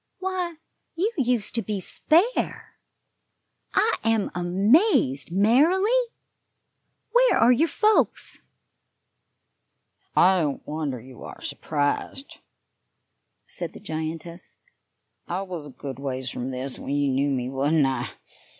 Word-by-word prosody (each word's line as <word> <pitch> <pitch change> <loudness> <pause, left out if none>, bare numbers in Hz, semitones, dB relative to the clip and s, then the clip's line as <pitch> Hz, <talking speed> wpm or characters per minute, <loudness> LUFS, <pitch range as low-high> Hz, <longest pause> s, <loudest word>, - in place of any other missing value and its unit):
Why, 370 -2 -3 0.4
you 385 +7 0
used 250 - 0
to 235 - 0
be 210 -1 -3
spare. 340 - +1 1.0
I 450 - +3
am 225 -2 +1
amazed, 180 - +2
Marilly! 290 - +4 1.2
Where - - +5
are 235 - +6
your 300 +7 +3
folks?" 425 +7 +1 1.7
"I 185 0 +5
don't 145 -3 -2
wonder 150 -4 -3
you 125 +1 -13
are - - -9
surprised," 145 - -2 1.1
said 485 +1 -6
the - - -10
giantess. 165 -1 -5 0.7
"I 185 +3 -2
was 175 -6 -7
a - - -10
good 135 -1 -8
ways 130 -2 -4
from 125 +1 -4
this 130 +1 -3
when 140 - -3
you 145 -1 +1
knew 140 +2 +1
me, 125 -3 -1
wasn't 145 +3 +2
I? 130 -2 -1
175 Hz, 115 wpm, -25 LUFS, -, 1.7 s, are